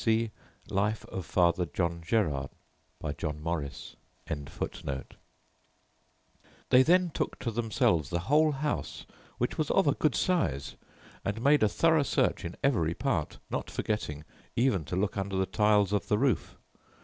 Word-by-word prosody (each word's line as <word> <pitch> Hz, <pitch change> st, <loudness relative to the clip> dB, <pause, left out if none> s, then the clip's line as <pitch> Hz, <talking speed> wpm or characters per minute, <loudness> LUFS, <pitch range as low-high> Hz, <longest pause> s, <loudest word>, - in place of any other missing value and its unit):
See 115 Hz, 0 st, +2 dB, 0.4 s
Life 105 Hz, +2 st, 0 dB
of 95 Hz, -3 st, -5 dB
Father 85 Hz, 0 st, +2 dB
John 85 Hz, +2 st, -2 dB
Gerard, 80 Hz, -, 0 dB, 0.5 s
by 75 Hz, -2 st, -3 dB
John 75 Hz, 0 st, -4 dB
Morris.] 75 Hz, -4 st, -4 dB, 0.3 s
"They 70 Hz, -, -5 dB
then 175 Hz, +4 st, +4 dB
took -, -, -2 dB
to 115 Hz, -, -3 dB
themselves 105 Hz, -, +1 dB
the 85 Hz, -, -1 dB
whole 150 Hz, -, +4 dB
house, 150 Hz, +1 st, -3 dB, 0.3 s
which 125 Hz, -, -2 dB
was 155 Hz, -, 0 dB
of 195 Hz, -, +3 dB
a 145 Hz, -, +4 dB
good 155 Hz, -, +1 dB
size, 70 Hz, -, 0 dB, 0.5 s
and 100 Hz, +2 st, -2 dB
made 145 Hz, +2 st, +5 dB
a 110 Hz, -, +4 dB
thorough 160 Hz, +6 st, +3 dB
search 140 Hz, -, +1 dB
in 85 Hz, +1 st, -5 dB
every 85 Hz, -, +2 dB
part, -, -, -1 dB
not -, -, -2 dB
forgetting 75 Hz, -9 st, -3 dB, 0.3 s
even 115 Hz, -, +2 dB
to 80 Hz, -, -4 dB
look 95 Hz, +1 st, 0 dB
under 100 Hz, 0 st, -2 dB
the 95 Hz, 0 st, +2 dB
tiles 105 Hz, +1 st, +3 dB
of 105 Hz, -, 0 dB
the 105 Hz, -, +2 dB
roof. 130 Hz, -2 st, 0 dB
100 Hz, 150 wpm, -29 LUFS, 85-125 Hz, 0.5 s, made